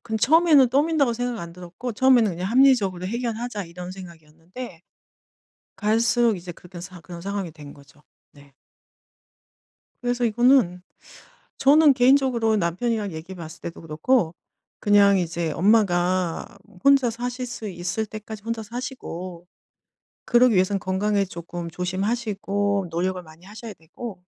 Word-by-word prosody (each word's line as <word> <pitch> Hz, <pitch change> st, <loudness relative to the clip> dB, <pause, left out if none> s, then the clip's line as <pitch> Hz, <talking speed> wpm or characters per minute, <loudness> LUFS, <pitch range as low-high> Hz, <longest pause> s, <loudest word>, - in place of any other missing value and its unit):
근데 220 Hz, -2 st, -3 dB
처음에는 305 Hz, -2 st, +5 dB
떠민다고 285 Hz, -1 st, +2 dB
생각 245 Hz, -1 st, -3 dB
안 170 Hz, 0 st, -8 dB
들었고 180 Hz, +7 st, -7 dB
처음에는 240 Hz, -4 st, +4 dB
그냥 180 Hz, +3 st, -4 dB
'합리적으로 225 Hz, -9 st, +3 dB
해결하자.' 235 Hz, -1 st, -3 dB
이런 180 Hz, +2 st, -9 dB
생각이었는데 170 Hz, +2 st, -11 dB, 0.9 s
갈수록 225 Hz, +1 st, +2 dB
이제 175 Hz, 0 st, -8 dB
그렇게 180 Hz, +1 st, -12 dB
된 180 Hz, -1 st, -10 dB
그런 170 Hz, -1 st, -10 dB
상황이 195 Hz, -3 st, -4 dB
된 150 Hz, -2 st, -12 dB
거죠. 140 Hz, +1 st, -20 dB, 0.3 s
네. 140 Hz, -1 st, -19 dB, 1.5 s
그래서 245 Hz, 0 st, 0 dB
이거는 235 Hz, -6 st, +3 dB, 0.8 s
저는 290 Hz, +1 st, +6 dB
개인적으로 250 Hz, -4 st, +3 dB
남편이랑 205 Hz, +3 st, -1 dB
얘기해 165 Hz, +4 st, -8 dB
봤을 165 Hz, -1 st, -9 dB
때도 170 Hz, -, -7 dB
그렇고 165 Hz, +4 st, 0 dB, 0.5 s
그냥 200 Hz, -1 st, +5 dB
이제 170 Hz, -2 st, -2 dB
엄마가 185 Hz, -3 st, +1 dB
뭐 180 Hz, -, -20 dB
혼자 275 Hz, -3 st, +5 dB
사실 245 Hz, +2 st, -4 dB
수 230 Hz, -3 st, -6 dB
있을 180 Hz, +4 st, -3 dB
때까지 215 Hz, 0 st, -9 dB
혼자 230 Hz, 0 st, -4 dB
사시고 185 Hz, -7 st, -7 dB, 0.8 s
그러기 245 Hz, 0 st, +4 dB
위해선 190 Hz, +1 st, +2 dB
건강에 200 Hz, +2 st, 0 dB
쪼끔 170 Hz, -1 st, -7 dB
조심하시고 200 Hz, +1 st, -1 dB
노력을 180 Hz, +2 st, -1 dB
많이 160 Hz, +3 st, -17 dB
하셔야 215 Hz, +1 st, -9 dB
되고 180 Hz, +4 st, -10 dB
200 Hz, 330 characters per minute, -24 LUFS, 175-240 Hz, 1.5 s, 저는